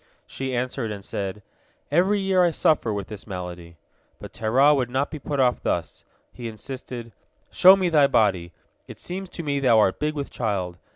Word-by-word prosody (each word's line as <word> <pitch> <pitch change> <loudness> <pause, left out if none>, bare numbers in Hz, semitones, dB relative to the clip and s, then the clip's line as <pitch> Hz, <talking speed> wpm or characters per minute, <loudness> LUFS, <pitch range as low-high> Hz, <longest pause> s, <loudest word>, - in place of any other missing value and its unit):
She 130 -1 -4
answered, 125 -1 -2
and 100 -2 -7
said, 100 0 -5 0.5
"Every 190 +6 +3
year 190 -2 +2
I 175 - +4
suffer 155 -7 +1
with 100 -2 -3
this 105 -1 -10
malady." 90 -3 -7 0.4
But - - -11
Terah 130 +7 +3
would 130 -4 0
not 135 +3 -1
be 155 - -6
put 145 0 -4
off 125 -2 +2
thus. 85 - -3 0.3
He 120 - -7
insisted: 120 +1 -7 0.4
"Show 185 +1 +8
me 190 -2 0
thy 150 -4 +4
body. 95 -9 +1 0.4
It - - -10
seems 190 +1 -6
to 170 - -7
me 140 -2 -1
thou 125 -4 +4
art 95 -3 +3
big 150 +1 -1
with 140 -2 -5
child. 95 -6 -3
125 Hz, 185 wpm, -24 LUFS, 105-150 Hz, 0.5 s, Show